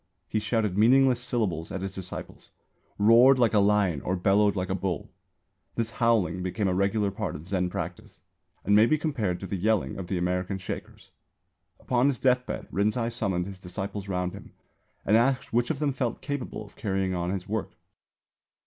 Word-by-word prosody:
He 110 - 0
shouted 105 -3 0
meaningless 125 +2 +5
syllables 110 -10 -2
at 95 - -4
his 95 -1 -4
disciples; 95 -1 -8 0.5
roared 120 +6 +6
like 120 -3 +3
a 105 - +5
lion 100 -7 +2
or 90 - -1
bellowed 100 +2 +3
like 95 -1 -2
a - - +2
bull. 95 -1 -3 0.6
This 115 0 -1
"howling" 105 -7 +1
became 95 +3 -1
a 95 - +1
regular 100 +2 +1
part 105 +2 -4
of 75 +3 -9
Zen 90 -2 0
practice, - - -6 0.5
and 100 - +4
may 110 +2 +6
be 155 - +3
compared 115 - -1
to - - -4
the 95 - -3
yelling 105 +3 0
of 90 - -6
the 95 - -1
American 90 +2 -1
Shakers. 95 - -8 0.7
Upon 125 +1 +1
his 140 -3 +1
deathbed 125 -1 0
Rinzai 110 +4 0
summoned 95 -4 -1
his 95 -1 -8
disciples 100 +2 -6
round 90 -1 -1
him - - -11 0.5
and 105 - +4
asked 130 +3 +2
which 120 +1 +2
of 160 - -1
them 145 -1 0
felt 125 -3 -2
capable 140 -6 -5
of 100 - -17
carrying 95 -2 -1
on 90 -1 -2
his 95 -1 -3
work. 110 0 -3
100 Hz, 185 wpm, -27 LUFS, 95-115 Hz, 0.7 s, roared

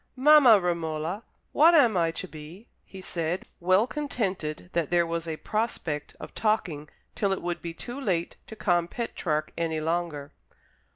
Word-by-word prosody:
"Mamma 265 -5 +7
Romola, 170 +2 -2 0.3
what 330 +3 +6
am 245 -9 +5
I 170 -2 +2
to 175 +3 -5
be?" 165 +8 -11 0.2
he 190 - -11
said, 170 0 -3
well 185 +4 +3
contented 195 - -3
that 170 -3 0
there 175 -1 +3
was 165 0 -3
a 160 -1 -3
prospect 175 -10 -3
of - - -9
talking 175 -9 -1 0.2
till 200 -2 0
it 190 - -2
would 175 0 -3
be 170 -1 -6
too 245 +9 -7
late 175 -8 -1
to 220 - -9
con 175 -5 +1
Petrarch 175 -8 -3
any 165 -2 -1
longer. 155 -3 -2
175 Hz, 160 wpm, -27 LUFS, 165-215 Hz, 0.3 s, Mamma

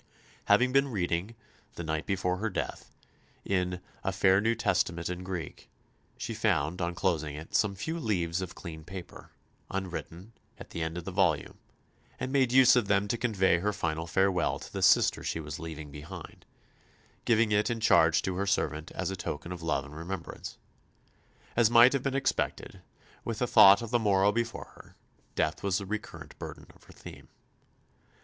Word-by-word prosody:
Having 125 +1 +4
been 135 +1 +3
reading, 95 -1 -2 0.4
the 85 - -5
night 80 0 -3
before 90 -2 0
her 110 +3 -2
death, 95 - -5 0.6
in 90 -2 -1 0.2
"a 95 - 0
fair 95 +1 +4
New 115 +2 +2
Testament 90 -5 0
in 90 0 -5
Greek," 90 -3 -6 0.5
she - - -4
found, 80 +6 0
on 85 0 -2
closing 80 -6 -1
it, 80 +2 -10
some 100 -2 +2
few 160 - -4
leaves 90 - -1
of 90 -2 -6
clean 80 -3 -8
paper, 95 +1 -10 0.4
unwritten, 95 +1 -6 0.2
at - - -12
the 85 - -5
end 80 +1 -3
of 90 - -5
the 95 - -4
volume, 90 -7 0 0.6
and 130 - -3
made 135 -3 +2
use 130 -1 +7
of 120 -5 +2
them 100 0 +2
to 120 - +1
convey 100 -7 +2
her 105 +4 0
final 80 -3 -3
farewell 95 -1 +1
to - - -11
the - - -3
sister - - +4
she - - -2
was 75 -2 -6
leaving 80 -3 -7
behind, 80 +4 -10 0.8
giving 115 -2 +3
it 105 +2 +2
in 120 -1 -2
charge 85 -8 +4
to 95 -1 -2
her 100 +1 -1
servant 80 -3 -1
as 95 0 -2
a - - -3
token 85 -2 -5
of 90 -2 -6
love 75 -4 -1
and 75 +1 -12
remembrance. 85 +2 -7 1.0
As 115 -2 +4
might 120 +2 +7
have 140 - 0
been 135 0 -2
expected, 135 -1 -2 0.4
with 115 -2 -4
the 125 - +1
thought 100 -2 +7
of 115 - -7
the 120 - +3
morrow 100 -2 +3
before 115 +1 -3
her, - - -16 0.4
death 80 +1 0
was 100 -2 +1
the 100 - -4
recurrent 85 -7 -7
burden - - -8
of - - -22
her - - -16
theme. - - -12
95 Hz, 180 wpm, -29 LUFS, 85-110 Hz, 1.0 s, use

